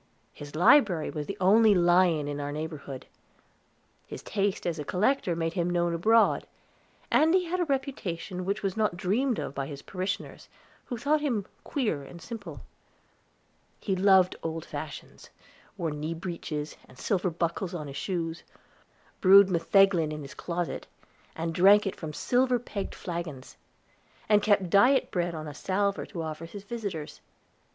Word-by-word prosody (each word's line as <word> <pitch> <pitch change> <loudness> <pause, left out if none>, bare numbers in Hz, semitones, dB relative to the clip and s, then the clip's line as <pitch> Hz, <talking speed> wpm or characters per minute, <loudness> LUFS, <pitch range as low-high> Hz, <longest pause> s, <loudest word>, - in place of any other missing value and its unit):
His 145 0 -10
library 180 - +4
was 150 -2 -5
the 200 - -5
only 210 +3 +5
lion 175 -3 +3
in 145 0 -4
our 145 0 -3
neighborhood. 150 -3 -6 1.0
His - - -8
taste 200 -1 -1
as 170 -3 -2
a - - -3
collector 190 - +1
made 165 0 -2
him 175 -2 0
known 175 -1 +1
abroad, 220 +7 +3 0.6
and 320 +3 +4
he 365 -1 +2
had 360 +2 -2
a 350 - +1
reputation 210 - -3
which 200 +3 -2
was 195 -2 -1
not 215 -5 0
dreamed 220 +7 0
of - - -4
by 135 -1 -3
his 140 -1 -8
parishioners, 190 +1 -5 0.4
who 245 - -5
thought 295 +5 +1
him 235 -10 -1 0.2
queer 225 - -1
and 170 +5 -11
simple. 195 -7 -8 1.2
He 195 - -1
loved 190 -1 +4
old 165 0 -4
fashions; - - -8 0.5
wore 165 -4 -2
knee 150 +3 -4
breeches, 160 -3 -5
and - - -17
silver 190 - 0
buckles 170 +2 -2
in 155 -3 -5
his 140 -1 -8
shoes; 170 -1 -3 0.8
brewed 195 0 +7
metheglin 170 -1 +3
in 150 -1 -6
his 135 - -9
closet, 175 -1 -4 0.5
and 165 0 -3
drank 200 +5 +6
it 195 - -2
from 160 -2 -6
silver 245 - +1
pegged 215 -4 -6
flagons; 170 -7 -6 0.7
and 210 -1 +4
kept 200 -4 +2
diet 250 +7 +4
bread 175 -2 -1
on 155 -1 -6
a 150 - -7
salver 200 +6 -1
to 170 -4 -5
offer 160 +1 -6
his 200 +3 -9
visitors. 205 -9 -6
180 Hz, 160 wpm, -28 LUFS, 160-205 Hz, 1.2 s, brewed